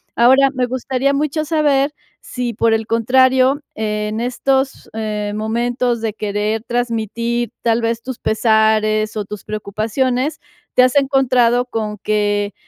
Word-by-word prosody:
Ahora, 265 Hz, +3 st, +5 dB
me 255 Hz, -1 st, 0 dB
gustaría 260 Hz, +2 st, -1 dB
mucho 305 Hz, +2 st, -1 dB
saber 295 Hz, -2 st, +1 dB, 0.3 s
sí 245 Hz, -2 st, -4 dB
por 225 Hz, +1 st, +2 dB
el 225 Hz, 0 st, -1 dB
contrario, 260 Hz, +4 st, +3 dB
en 210 Hz, 0 st, -2 dB
estos, 265 Hz, +2 st, -1 dB
em, 210 Hz, -2 st, -3 dB
momentos 235 Hz, +2 st, -1 dB
de 225 Hz, -1 st, -1 dB
querer 210 Hz, +1 st, -2 dB
transmitir 235 Hz, 0 st, -2 dB
tal 230 Hz, 0 st, +1 dB
vez 230 Hz, 0 st, -1 dB
tus 260 Hz, -1 st, -7 dB
pesares 215 Hz, -1 st, +2 dB
o 210 Hz, -, -2 dB
tus 205 Hz, -1 st, -9 dB
preocupaciones, 245 Hz, +7 st, -2 dB, 0.3 s
te 250 Hz, -, +5 dB
has 255 Hz, +2 st, +3 dB
encontrado 255 Hz, -3 st, +3 dB
con 215 Hz, -3 st, -4 dB
que, 205 Hz, -1 st, 0 dB
235 Hz, 135 wpm, -18 LUFS, 215-260 Hz, 0.3 s, Ahora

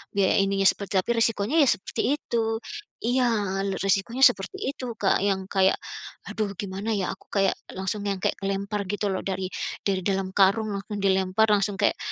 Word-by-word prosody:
biaya 200 Hz, -1 st, +3 dB
ininya, 195 Hz, 0 st, +1 dB
seperti 200 Hz, +1 st, +1 dB
tapi 210 Hz, -, -2 dB
resikonya 230 Hz, +6 st, +1 dB
ya 290 Hz, -, +6 dB
seperti 190 Hz, -, 0 dB
itu. 235 Hz, -6 st, -2 dB, 0.6 s
Iya, 250 Hz, +2 st, +2 dB, 0.4 s
re 195 Hz, -1 st, -1 dB
resikonya 195 Hz, +6 st, 0 dB
seperti 205 Hz, -, +4 dB
itu, 265 Hz, -, -8 dB, 0.2 s
Kak, 195 Hz, -, +3 dB
yang 190 Hz, -1 st, -1 dB
kayak 190 Hz, -1 st, +3 dB, 0.6 s
aduh 210 Hz, -3 st, -2 dB
gimana 200 Hz, +3 st, -4 dB
ya, 195 Hz, -3 st, -1 dB
aku -, -, -24 dB
kayak 195 Hz, -2 st, +2 dB, 0.2 s
langsung 195 Hz, +2 st, -3 dB
yang 195 Hz, -2 st, -2 dB
kayak -, -, 0 dB
kelempar 200 Hz, +1 st, -2 dB
gitu 205 Hz, +1 st, -2 dB
loh, 190 Hz, -, -3 dB
dari 190 Hz, -1 st, -2 dB, 0.3 s
dari 190 Hz, -2 st, 0 dB
dalam 195 Hz, -1 st, 0 dB
karung 205 Hz, +3 st, +4 dB
langsung 205 Hz, +1 st, -6 dB
dilempar, 190 Hz, +2 st, +2 dB
langsung 205 Hz, -1 st, +2 dB
kayak -, -, +2 dB
200 Hz, 175 wpm, -25 LUFS, 190-215 Hz, 0.6 s, ya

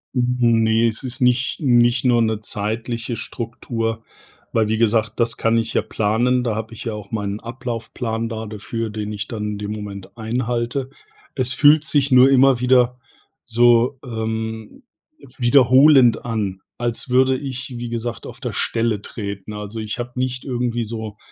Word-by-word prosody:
N 120 Hz, -2 st, +2 dB
Ne, 110 Hz, +1 st, +3 dB
es 115 Hz, +3 st, -4 dB
ist 130 Hz, +1 st, -5 dB
nicht 125 Hz, +3 st, +2 dB
nicht 120 Hz, -3 st, +3 dB
nur 120 Hz, -2 st, +4 dB
'ne 110 Hz, -1 st, 0 dB
zeitliche 115 Hz, +3 st, -3 dB
Struktur, 115 Hz, 0 st, -4 dB, 0.5 s
weil 110 Hz, -2 st, +2 dB
wie 110 Hz, 0 st, 0 dB
gesagt, 115 Hz, 0 st, +1 dB
das 115 Hz, -1 st, +1 dB
kann 115 Hz, 0 st, +2 dB
ich 115 Hz, 0 st, -3 dB
ja -, -, +2 dB
planen, 120 Hz, +4 st, +1 dB
da 115 Hz, -3 st, -1 dB
habe 110 Hz, +1 st, -5 dB
ich -, -, -8 dB
ja 115 Hz, -, -2 dB
auch 105 Hz, -2 st, -9 dB
meinen 105 Hz, -1 st, -3 dB
Ablaufplan 115 Hz, -1 st, -4 dB
da 110 Hz, -1 st, -5 dB
dafür, 110 Hz, +2 st, -4 dB
den 105 Hz, 0 st, -5 dB
ich 100 Hz, 0 st, -5 dB
dann 110 Hz, -3 st, -5 dB
in -, -, -5 dB
dem 105 Hz, 0 st, -4 dB
Moment 100 Hz, 0 st, -8 dB
einhalte. 120 Hz, +3 st, -2 dB, 0.5 s
Es 125 Hz, -1 st, 0 dB
fühlt 150 Hz, +3 st, +5 dB
sich 140 Hz, -1 st, +2 dB
nur 130 Hz, +1 st, +7 dB
immer 135 Hz, -1 st, +5 dB
wieder 125 Hz, 0 st, +3 dB, 0.5 s
so, 120 Hz, +2 st, +3 dB
ähm, 110 Hz, -2 st, -5 dB, 0.5 s
wiederholend 130 Hz, +1 st, +5 dB
an, 100 Hz, -5 st, -3 dB, 0.2 s
als 120 Hz, +1 st, -2 dB
würde 130 Hz, +1 st, +3 dB
ich, 130 Hz, -2 st, -6 dB
wie 120 Hz, 0 st, -5 dB
gesagt, 120 Hz, 0 st, -4 dB
auf -, -, -10 dB
der -, -, -4 dB
Stelle 115 Hz, -3 st, 0 dB
treten. 100 Hz, -1 st, -6 dB
Also, 105 Hz, +2 st, -6 dB
ich 110 Hz, +2 st, -4 dB
habe 120 Hz, 0 st, -4 dB
nicht 125 Hz, 0 st, -2 dB
irgendwie 120 Hz, -2 st, -2 dB
so 110 Hz, -1 st, -6 dB
115 Hz, 165 wpm, -21 LUFS, 110-125 Hz, 0.5 s, nur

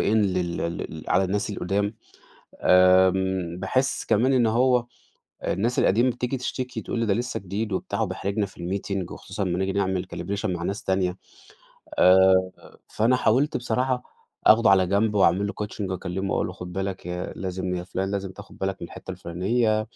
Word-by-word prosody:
لل 95 Hz, -5 st, +1 dB
ال 80 Hz, -2 st, -4 dB
على 95 Hz, +1 st, +3 dB
الناس 100 Hz, +3 st, -1 dB
القُدام. 100 Hz, +2 st, -1 dB, 0.7 s
آمم 95 Hz, -1 st, +4 dB
باحِس 130 Hz, +8 st, 0 dB
كمان 125 Hz, +6 st, +2 dB
إن 125 Hz, -3 st, +4 dB
هو 120 Hz, +2 st, +3 dB, 0.6 s
الناس 115 Hz, +6 st, 0 dB
القديمة 120 Hz, +6 st, +3 dB
بتيجي 125 Hz, +2 st, -3 dB
تشتكي، 125 Hz, 0 st, -4 dB
تقول -, -, -3 dB
لي 115 Hz, -, +1 dB
ده 105 Hz, -, +2 dB
لسّه 120 Hz, +4 st, -2 dB
جديد 100 Hz, +3 st, -4 dB
وبتاع 95 Hz, -, -2 dB
وبيحرجنا 100 Hz, +2 st, -1 dB
في 95 Hz, -, -14 dB
الmeeting، 95 Hz, +1 st, -3 dB
وخصوصّا 100 Hz, +1 st, -5 dB
أمّا 90 Hz, -2 st, -1 dB
نيجي 95 Hz, 0 st, 0 dB
نعمل 95 Hz, -2 st, -1 dB
calibration 100 Hz, +4 st, -3 dB
مع 90 Hz, -4 st, -2 dB
ناس 100 Hz, +3 st, -3 dB
تانية. 95 Hz, -1 st, 0 dB, 0.8 s
آآ 95 Hz, 0 st, +6 dB, 0.4 s
فأنا 115 Hz, +4 st, +2 dB
حاولت 125 Hz, +5 st, +2 dB
بصراحة 125 Hz, +1 st, -1 dB, 0.4 s
أخده 110 Hz, 0 st, +6 dB
على 95 Hz, -2 st, +5 dB
جنب، 105 Hz, +3 st, +1 dB
واعمل 100 Hz, 0 st, +3 dB
له 100 Hz, -, -4 dB
coaching 105 Hz, -2 st, -5 dB
واكلّمه 95 Hz, +1 st, -3 dB
واقول -, -, 0 dB
له 90 Hz, -, -7 dB
خُد 90 Hz, -1 st, -8 dB
بالك 95 Hz, 0 st, -4 dB
يا 90 Hz, 0 st, -4 dB
لازم 95 Hz, 0 st, -3 dB
يا 90 Hz, -, -4 dB
فُلان 95 Hz, +2 st, -3 dB
لازم 100 Hz, -1 st, -3 dB
تاخُد 95 Hz, -, -13 dB
بالك 95 Hz, 0 st, -2 dB
من 85 Hz, -, -5 dB
الحتّة -, -, -9 dB
الفُلانية. 110 Hz, +6 st, 0 dB
95 Hz, 170 wpm, -25 LUFS, 90-110 Hz, 0.8 s, آآ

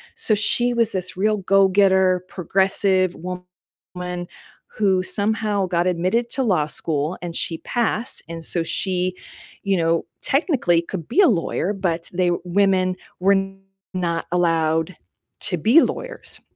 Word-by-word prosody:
So 215 Hz, -, +1 dB
she 240 Hz, +4 st, +3 dB
was 230 Hz, -2 st, +1 dB
this 185 Hz, -1 st, -4 dB
real 215 Hz, +2 st, +2 dB
go-getter, 190 Hz, -1 st, +3 dB
progressive 190 Hz, 0 st, +1 dB
woman 180 Hz, 0 st, -8 dB, 0.4 s
who 190 Hz, -3 st, +1 dB
somehow 205 Hz, -1 st, -1 dB
got 175 Hz, 0 st, 0 dB
admitted 185 Hz, +7 st, 0 dB
to 265 Hz, -, 0 dB
law 180 Hz, -10 st, +2 dB
school, 155 Hz, +2 st, -2 dB
and 170 Hz, -2 st, -6 dB
she 165 Hz, -, 0 dB
passed 235 Hz, 0 st, -2 dB
and 165 Hz, -1 st, -7 dB
so 170 Hz, -2 st, -2 dB
she, 185 Hz, +1 st, -1 dB, 0.5 s
you 195 Hz, -1 st, +1 dB
know, 165 Hz, 0 st, +1 dB, 0.2 s
technically 265 Hz, -, +2 dB
could 170 Hz, -2 st, -7 dB
be 330 Hz, -, 0 dB
a 380 Hz, -, +6 dB
lawyer, 190 Hz, 0 st, 0 dB
but 175 Hz, -4 st, -2 dB
they 180 Hz, -1 st, +1 dB
Women 185 Hz, 0 st, +2 dB, 0.2 s
were 195 Hz, +2 st, +4 dB, 0.6 s
not 170 Hz, -3 st, -2 dB
allowed 165 Hz, 0 st, +1 dB, 0.5 s
to 185 Hz, -, +2 dB
be 230 Hz, -, +5 dB
lawyers, -, -, -4 dB
185 Hz, 135 wpm, -22 LUFS, 175-205 Hz, 0.6 s, a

